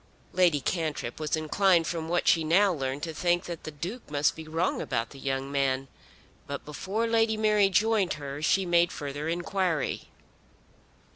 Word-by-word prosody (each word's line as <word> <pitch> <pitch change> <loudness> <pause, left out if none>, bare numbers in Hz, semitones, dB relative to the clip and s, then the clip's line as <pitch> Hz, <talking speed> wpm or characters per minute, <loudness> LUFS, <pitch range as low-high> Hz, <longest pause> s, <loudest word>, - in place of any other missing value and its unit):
Lady 175 -5 +4
Cantrip 155 -6 -3
was 155 0 0
inclined 170 +2 +3
from 165 -1 -3
what 175 +1 0
she 165 - +5
now 185 +5 +4
learned 135 -2 -3
to 165 - -3
think 175 +2 +1
that 170 -2 -7
the - - -4
Duke 175 - -7
must 145 0 +1
be 160 -1 -9
wrong 165 +3 0
about 115 -3 -2
the 140 - -11
young 135 0 -2
man. 135 -1 0 0.6
But 140 0 -5
before 190 +9 -2
Lady 225 -1 +2
Mary 210 -2 +3
joined 210 0 +2
her 140 -1 -6
she 190 +5 +2
made 175 -1 +3
further 145 +1 -4
inquiry. 175 -2 -1
165 Hz, 165 wpm, -28 LUFS, 145-185 Hz, 0.6 s, she